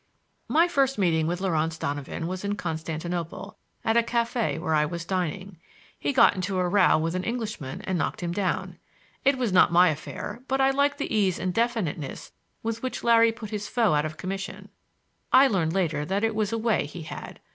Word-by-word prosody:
My 330 +3 +4
first 275 -5 +1
meeting 165 -5 +2
with 175 +2 -2
Laurance 165 -3 0
Donovan 145 +2 -4
was 185 +2 -4
in 200 0 -1
Constantinople, 165 0 -4 0.3
at 225 - +2
a - - +6
café 235 -3 -1
where 160 -1 -1
I 150 -1 +4
was 170 +2 -4
dining. 185 0 -3 0.4
He - - 0
got 265 - +6
into 185 +1 -2
a 180 -1 +1
row 200 -1 +4
with 165 +2 -1
an 185 0 -2
Englishman 215 - -4
and 185 -2 -1
knocked - - -2
him 170 - -1
down. 185 +1 -2 0.4
It 275 0 +3
was 240 -6 -1
not 180 -1 +6
my 180 +1 +6
affair, 155 +9 -5
but 270 0 0
I 270 0 +4
liked 285 +1 +1
the 280 -5 -2
ease 195 -4 +2
and 185 0 -2
definiteness 220 - -2 0.3
with 225 0 -3
which 255 - -4
Larry 230 -1 +5
put 225 -1 -9
his 210 -1 -3
foe 230 -8 +2
out 150 0 +2
of 155 0 -5
commission. 195 +1 -5 0.6
I 265 +2 +8
learned 175 -10 +1
later 160 -6 0
that 195 +6 -1
it 225 0 +1
was 215 -1 -1
a 230 - 0
way 225 -7 +1
he 160 +2 -8
had. - - -8
190 Hz, 200 wpm, -26 LUFS, 165-230 Hz, 0.6 s, I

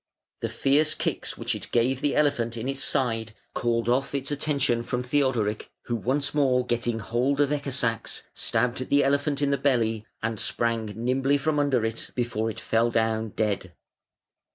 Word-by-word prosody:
The - - -2
fierce 150 +3 +2
kicks - - -3
which - - -1
it - - -6
gave 125 +3 +2
the 145 - +1
elephant 120 -6 +1
in 115 +3 -3
its 135 0 -2
side 115 -5 0 0.2
called 115 -1 0
off 135 +3 +1
its 140 +1 -2
attention 140 -5 +1
from 125 +1 -2
Theodoric, 125 -6 0
who 120 - -2
once 140 +5 0
more 130 -4 +3
getting 120 -1 0
hold 125 +6 0
of 145 -1 +3
Ecke 145 -1 -1
sax, 115 -4 -1
stabbed 125 +3 0
the 140 0 +4
elephant 140 +1 +1
in 140 - +2
the 140 - +1
belly, 115 -6 +1 0.2
and 110 -2 -1
sprang 115 0 0
nimbly 130 +5 +1
from 150 +1 0
under 135 -6 +2
it 115 0 -4
before 115 -2 -1
it 110 - -6
fell 115 +1 +2
down 110 -1 0
dead. 100 -4 -1
125 Hz, 175 wpm, -26 LUFS, 115-140 Hz, 0.2 s, the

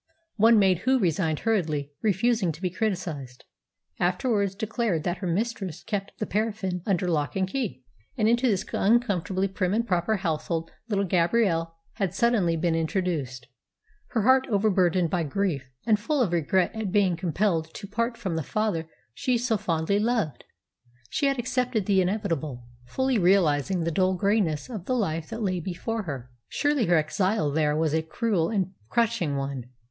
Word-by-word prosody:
One 225 +2 +6
maid 190 -4 +4
who 260 +6 +2
resigned 165 - 0
hurriedly, 155 -10 0
refusing 215 -2 +2
to 155 - -13
be 180 - 0
criticised, 170 - -3 0.6
afterwards 200 +2 +1
declared 215 -6 -1
that 175 0 -1
her 185 - -3
mistress 190 -2 -2
kept 200 -2 -4
the 215 - -2
paraffin 205 -4 -2
under 185 -3 +1
lock 150 -4 0
and 190 -1 +1
key. 190 - -3 0.3
And 215 - +2
into 240 +3 +3
this 200 -5 +1
uncomfortably 195 -4 +2
prim 190 0 -1
and 230 +1 0
proper 180 +3 +1
household 165 -2 -2 0.2
little 200 -2 +1
Gabrielle 170 -2 +1 0.2
had 195 -3 -1
suddenly 210 -9 +2
been 165 +1 +1
introduced. 160 -7 -2 0.6
Her 225 -4 -1
heart 260 +3 +4
overburdened 185 -5 +2
by 180 - +1
grief, 155 -4 -1 0.2
and 215 -3 +3
full 290 +7 0
of 195 - -1
regret 175 +2 +1
at 220 -4 -3
being 190 -3 +3
compelled 170 -1 0
to 205 - -7
part 230 +4 -2
from 185 -4 -3
the - - 0
father 170 -1 -1 0.3
she 250 - 0
so 235 -1 0
fondly 170 +1 0
loved, 220 - -1 0.7
she 280 - +1
had 275 0 +1
accepted 250 -3 0
the 195 -1 +3
inevitable, 165 - -2 0.2
fully 260 - +1
realising 180 -2 +3
the 165 +1 -1
dull 185 +3 +2
greyness 190 -5 +1
of 215 -8 -7
the 255 - 0
life 165 -8 -1
that 225 0 -4
lay 185 -3 0
before 190 +6 -3
her. 135 - -6 0.2
Surely 290 -6 +1
her 175 -1 +4
exile 160 +1 +1
there 150 0 +1
was 160 -1 +1
a 160 - +2
cruel 170 +1 0
and 190 -4 0 0.2
crushing 230 -10 +1
one! 135 -3 -4
190 Hz, 165 wpm, -26 LUFS, 165-220 Hz, 0.7 s, One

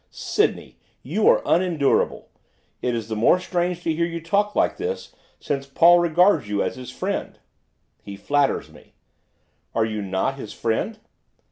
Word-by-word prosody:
'Sydney! 425 - -1 0.2
you - - 0
are - - +4
unendurable! 165 -6 +1 0.5
It 125 -1 -1
is 115 -2 -4
the 110 - -3
more 115 +11 +4
strange 175 -1 -2
to 165 - 0
hear 165 +2 -1
you 170 0 -5
talk 200 +5 0
like - - +1
this 470 +2 -5 0.3
since 140 -1 -3
Paul 170 +5 +6
regards 170 - +3
you 105 -1 0
as - - -3
his 130 -1 -9
friend.' - - -4 0.6
'He 100 - -9
flatters 140 +7 0
me.' - - -19 0.8
'Are 115 - +2
you 110 -1 -3
not 100 +8 -2
his 110 - -7
friend? 115 - -2
155 Hz, 155 wpm, -23 LUFS, 115-180 Hz, 0.8 s, Paul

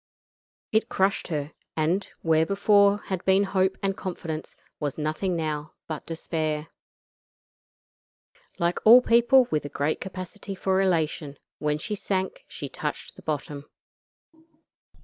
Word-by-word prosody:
It 220 +1 +2
crushed 195 +1 +1
her, 150 -3 -3 0.3
and, 170 +6 +1 0.2
where 160 -1 +4
before 200 +2 +4
had 185 -2 -3
been 190 +1 +4
hope 190 -1 +1
and 195 -1 +1
confidence, 165 -5 -5 0.2
was 145 -3 -3
nothing 155 +4 -1
now 155 -2 -3
but 155 -2 -6
despair. 160 -1 -2 1.9
Like 170 -1 0
all 240 +3 +9
people 240 +2 +5
with 155 - +1
a 145 - -5
great 145 +2 -1
capacity 190 +1 -6
for 190 0 +1
elation, 160 -5 0 0.2
when 150 0 0
she 210 +7 -4
sank 195 - -2
she - - -6
touched - - -5
the - - -13
bottom. 145 -1 -4
175 Hz, 130 wpm, -26 LUFS, 155-195 Hz, 1.9 s, all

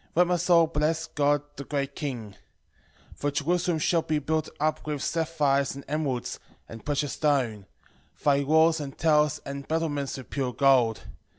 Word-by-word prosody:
13:15 - - -33
Let 175 +1 +5
my 180 - +2
soul 170 -1 +4
bless 160 +1 0
God 145 -2 +1 0.2
the 140 - -5
great 140 -1 -3
King. 125 -8 -5 0.8
13:16 - - -21
For 145 - -1
Jerusalem 170 +4 0
shall 165 +2 +2
be 155 -1 -1
built 155 +1 -1
up 155 +1 0
with 150 -2 -2
sapphires 150 -5 +1
and 140 - -9
emeralds, 140 -5 -2 0.3
and 115 -1 -10
precious 145 -1 -1
stone: 125 -10 0 0.6
thy 140 -1 +3
walls 160 +3 +4
and 140 -2 -7
towers 150 -2 +2
and 140 0 -6
battlements 150 -4 -1
with 130 - -11
pure 130 -3 -2
gold. 125 -3 +3
145 Hz, 170 wpm, -27 LUFS, 140-160 Hz, 0.8 s, Let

